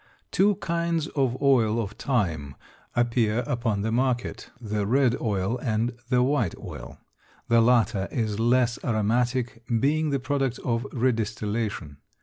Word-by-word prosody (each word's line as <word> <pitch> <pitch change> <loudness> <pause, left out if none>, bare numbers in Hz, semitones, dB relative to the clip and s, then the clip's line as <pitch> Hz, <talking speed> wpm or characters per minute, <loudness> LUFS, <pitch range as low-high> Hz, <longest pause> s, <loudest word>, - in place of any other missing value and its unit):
Two 200 +1 +3
kinds 170 -2 -1
of 130 -4 0
oil 115 -5 +3
of 105 -3 -2
thyme 85 - -2 0.4
appear 120 -1 +2
upon 115 -4 -1
the 110 - -1
market, 125 +1 -1
the 105 -3 -2
red 125 +1 +3
oil 105 +1 -1
and 115 0 -1
the 125 -1 +3
white 125 - +1
oil. - - -9 0.5
The 115 0 +5
latter 115 -5 +3
is 110 -3 -1
less 120 +1 +2
aromatic 120 +2 0 0.2
being 155 +4 +1
the 140 -1 0
product 135 -1 -1
of 120 +1 0
redistillation. 110 - -2
120 Hz, 135 wpm, -26 LUFS, 110-130 Hz, 0.5 s, The